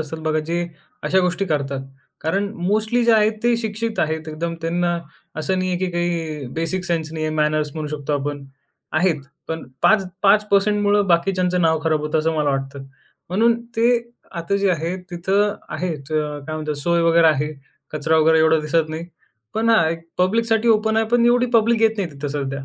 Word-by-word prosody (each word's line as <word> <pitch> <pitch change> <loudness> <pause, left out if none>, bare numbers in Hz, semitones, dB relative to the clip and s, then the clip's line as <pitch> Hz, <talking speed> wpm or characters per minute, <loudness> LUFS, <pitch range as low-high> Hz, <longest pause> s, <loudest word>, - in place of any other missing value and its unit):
असतात 160 +1 -5
बघा 155 0 0
जे 170 +1 0 0.4
अशा 175 +6 +2
गोष्टी 180 +1 0
करतात. 140 -5 -2 0.4
कारण 195 +6 0 0.2
मोस्टली 220 +4 +1
जे 235 - +5
आहेत 215 0 +4
ते 240 0 +3
शिक्षित 225 0 -3
आहेत. 160 0 -2
एकदम 165 +2 -3
त्यांना 175 +1 0 0.5
असं 185 +5 0
नाही 185 0 -1
आहे, 180 - -1
की 185 - -1
काही 165 -4 -2
बेसिक 165 +3 -1
सेन्स 165 -3 -2
नाही 155 -1 -3
आहे, 155 - -2
मॅनर्स 150 -1 +1
म्हणू 155 -1 -4
शकतो 150 -1 -4
आपण. 145 0 -4 0.5
आहेत. 160 -1 +2 0.3
पण 160 0 -4 0.2
5 215 -3 +4 0.2
5% 205 0 +3
मुळं 205 0 +3
बाकीच्यांचं 180 +1 +1
नाव 160 -1 +2
खराब 155 -2 +2
होतं 150 +1 -1
असं 160 +1 0
मला 150 -2 +1
वाटतं. 135 0 -4 0.4
म्हणून 230 +6 +2 0.2
ते 235 +2 +4 0.3
आता 170 +2 -1
जे 200 -1 +2
आहे 170 +1 -1
तिथं 195 +4 +1
आहेत 165 -6 -3
काय 150 0 -2
म्हणतात 155 -1 -3
सोय 170 0 +2
वगैरे 165 0 +5
आहे. 150 0 0 0.4
कचरा 155 +1 +1
वगैरे 160 +1 +4
एवढा 160 0 +4
दिसत 155 +1 0
नाही. 160 +2 -5 0.5
पण 225 +1 +1
हा 220 -8 +4
एक 165 +1 -3 0.2
पब्लिकसाठी 225 +4 +2
ओपन 220 0 +3
आहे 225 0 +2
पण 235 -1 +4
एवढी 245 +1 +4
पब्लिक 225 0 +3
येत 225 -1 +5
नाही 185 -4 -1
तिथं 140 +1 -5
सध्या. 140 -1 -4
170 Hz, 185 wpm, -21 LUFS, 155-205 Hz, 0.5 s, जे